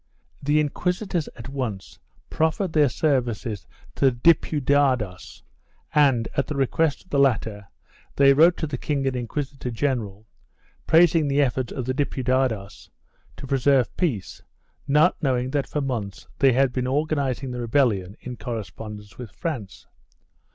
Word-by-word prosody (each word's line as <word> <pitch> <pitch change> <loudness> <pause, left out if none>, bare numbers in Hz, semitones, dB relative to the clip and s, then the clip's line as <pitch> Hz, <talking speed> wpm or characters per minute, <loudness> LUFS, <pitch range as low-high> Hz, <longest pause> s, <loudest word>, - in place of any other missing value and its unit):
The 145 +2 +2
inquisitors 180 +3 -1
at 115 - -9
once 125 -8 -5 0.3
proffered 160 +3 0
their 150 -3 +4
services 120 - -1 0.3
to - - 0
the 135 - +6
Diputados 130 - +1 0.5
and, 135 -6 +3
at 140 - 0
the 150 - -4
request 140 +3 0
of 185 - -29
the 140 - +2
latter, 110 -6 +1 0.5
they 140 0 +6
wrote 165 +5 +5
to - - -2
the 145 -4 -5
king 140 -2 -1
and 135 -1 0
inquisitor 130 +2 -4
general 110 -5 -2 0.6
praising 165 -2 +5
the 140 +1 +3
efforts 130 -2 -1
of 130 - -4
the 130 - -1
Diputados 130 -6 -1 0.5
to - - -8
preserve 135 -2 +2
peace, 130 - -2 0.5
not 150 +5 +3
knowing 130 -3 0
that 145 -1 -1
for 150 - -2
months 115 -8 -4
they 135 -2 +5
had 130 0 +2
been 125 -1 -1
organ 150 +3 0
izing 130 -1 -2
the 125 0 -4
rebellion 110 -6 +1
in 125 -1 -7
correspondence 105 -2 -7
with 120 -3 -7
France. 110 - -6
135 Hz, 145 wpm, -24 LUFS, 120-145 Hz, 0.6 s, the